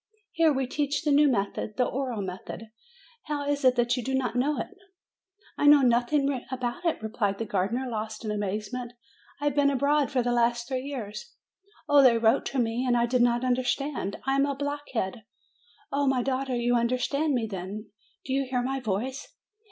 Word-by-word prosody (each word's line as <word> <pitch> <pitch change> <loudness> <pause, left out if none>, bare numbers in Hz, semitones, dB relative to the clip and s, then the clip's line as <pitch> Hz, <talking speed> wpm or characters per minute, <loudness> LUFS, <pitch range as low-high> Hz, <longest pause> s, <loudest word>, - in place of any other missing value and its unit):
Here 325 -1 +3
we 270 -2 0
teach 285 +2 -1
the 300 - +1
new 290 +1 +6
method, 210 -2 -2
the 250 - +3
oral 250 -6 -2
method. 190 +4 -7 0.5
How 290 -2 -3
is 285 0 0
it 255 -1 +5
that 240 0 +2
you 250 - -3
did 265 +3 0
not 250 -3 -2
know 285 +4 +1
it?" 390 - -6 0.8
"I 290 - +3
knew 290 -1 +8
nothing 255 +2 +2
about 250 +4 -3
it!" 325 -9 0
replied 210 -2 -1
the 225 - -3
gardener, 210 +6 -1
lost 220 -1 -5
in 215 - -1
amazement. 210 +4 -3 0.5
"I 290 - -4
have 290 - +2
been 285 -1 +4
abroad 280 +1 +2
for 255 -3 +1
the 245 - 0
last 235 0 +1
three 260 -1 -3
years. 270 - -6 0.5
Oh, 290 -1 +6
they 250 -3 +6
wrote 225 -1 +3
to 275 - -4
me, 235 0 0
and 245 -2 +2
I 235 - +3
did 245 +1 +1
not 240 +1 +2
understand. 255 -3 -1
I 270 - +1
am 275 +1 +3
a 280 - -2
blockhead. 280 -7 -3 0.7
Oh, 280 0 +1
my 260 -2 +2
daughter, 265 0 -1
you 240 0 +1
understand 255 +5 +1
me, 235 -2 0
then? 200 +1 -6 0.3
Do 265 - -2
you 270 0 0
hear 250 -1 0
my 270 +2 -1
voice? 255 +5 -4
250 Hz, 195 wpm, -27 LUFS, 230-280 Hz, 0.8 s, knew